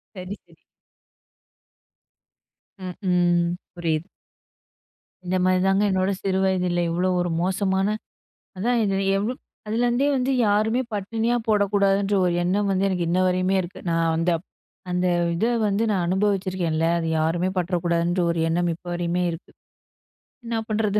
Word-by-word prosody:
சரி, 185 +2 -6
சரி. - - -22 2.2
ம், 180 -1 -5 0.2
ம், 175 -1 +3 0.3
புரியுது. 165 0 -2 1.2
இந்த 185 +1 0
மாதிரி 185 0 +3
தாங்க 195 +2 +3
என்னோட 190 +1 +1
சிறு 190 -1 +1
வயதுல 180 -2 +1
இவ்வளவு 180 +2 0
ஒரு 175 - -1
மோசமான 190 +1 +1 0.7
அதான். 240 +5 +1
இது 195 -2 0 0.2
எவ்ளோ, 215 +6 -1 0.3
அதுலேருந்தே 240 +5 +1
வந்து 265 +1 0 0.2
யாருமே 220 +4 +2
பட்டினியா 225 +4 -1
போடக்கூடாதுன்ற 200 -1 +2
ஒரு 175 - +1
எண்ணம் 200 +3 +1
வந்து 190 +1 +1
எனக்கு, 180 -3 -1
இன்ன 180 +2 +2
வரையுமே 185 +1 +1
இருக்கு. 175 +1 -9
நா 165 - +1 0.2
வந்து 165 +1 +1 0.6
அந்த 180 0 +1 0.3
இத 215 - 0 0.2
வந்து 205 +2 +1 0.2
அனுபவிச்சிருக்கேன் 190 -3 0
இல்லையா? 165 +1 +2
அத 165 - -2
யாருமே 170 +4 +1
பட்டுட 180 0 0
கூடாதுன்ற 170 +1 +1
ஒரு 170 - -2
எண்ணம் 175 +1 +1
இப்ப 175 - -14
வரையுமே 175 +1 -1
இருக்கு. 165 - -9 0.9
என்ன 230 -1 -2
பண்ணுறது? 210 -1 +1
185 Hz, 135 wpm, -24 LUFS, 175-205 Hz, 2.2 s, ம்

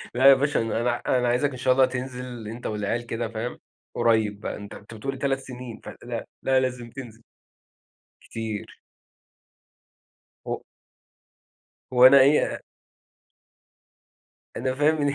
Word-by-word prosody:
لا 130 - +2
يا 135 - +10
باشا 145 +1 +1
أنا 115 +2 0
ع 120 - -3
أنا 125 -1 +2
عايزَك 125 +4 +2
إن 130 - -7
شاء 130 0 +3
الله 130 0 +5
تنزل 125 -2 -6
أنت 115 +3 -6
والعيال 105 +3 -2
كده 115 0 -3
فاهم، 115 +2 -5 0.4
قريّب 110 -3 +2
بقى، - - -4
أنت 100 0 -9
أنت 105 - -12
بتقول 135 +5 -4
3 135 0 0
سنين 125 -3 -9
فلأ، - - -6 0.2
لأ 130 0 +3
لازم 125 -2 -3
تنزل. 115 -3 -10 1.0
كتير. 110 -2 -6 1.7
هُ - - -3 1.3
وأنا 130 +2 +8
إيه 140 +3 +4
أ - - -7 2.0
أنا 130 0 -1
فاهم 150 +3 +3
إن 145 -2 +1
125 Hz, 135 wpm, -25 LUFS, 115-130 Hz, 2.0 s, يا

